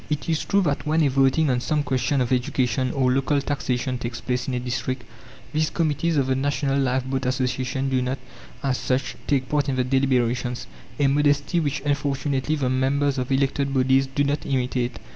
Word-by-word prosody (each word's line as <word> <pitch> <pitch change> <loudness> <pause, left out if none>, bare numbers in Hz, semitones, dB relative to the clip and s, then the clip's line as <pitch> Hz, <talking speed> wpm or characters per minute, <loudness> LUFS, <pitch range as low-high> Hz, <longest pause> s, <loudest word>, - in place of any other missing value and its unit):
It 150 -1 -2
is 160 -2 0
true 200 0 +3
that 145 -2 -1
when 160 +1 +3
a 145 - +3
voting 135 +3 +3
on 125 - +1
some 150 +4 0
question 130 0 0
of 125 0 -1
education 125 0 0
or 130 -2 +2
local 135 +2 +2
taxation 130 -3 -2
takes 120 -1 -4
place 125 0 -2
in 130 - -1
a - - 0
district, 125 +1 -3 0.5
these 155 0 +1
committees 160 0 0
of 135 - +3
the 130 0 +1
National 140 0 0
Lifeboat 130 0 0
Association 130 +1 -1
do 130 -1 +1
not, 130 +2 -1 0.5
as 135 -2 0
such, 130 0 -1
take 130 -3 +1
part 145 0 0
in 135 - 0
the 130 - +1
deliberations 125 -2 0 0.3
a 145 - +3
modesty, 145 +3 +2
which 145 -3 -1
unfortunately 140 0 0
the 140 -4 -1
members 135 +2 +1
of 125 +1 -3
elected 140 0 +1
bodies 130 +1 +3
do 135 +2 0
not 145 +1 -1
imitate. 125 -2 -1
135 Hz, 190 wpm, -24 LUFS, 130-145 Hz, 0.5 s, true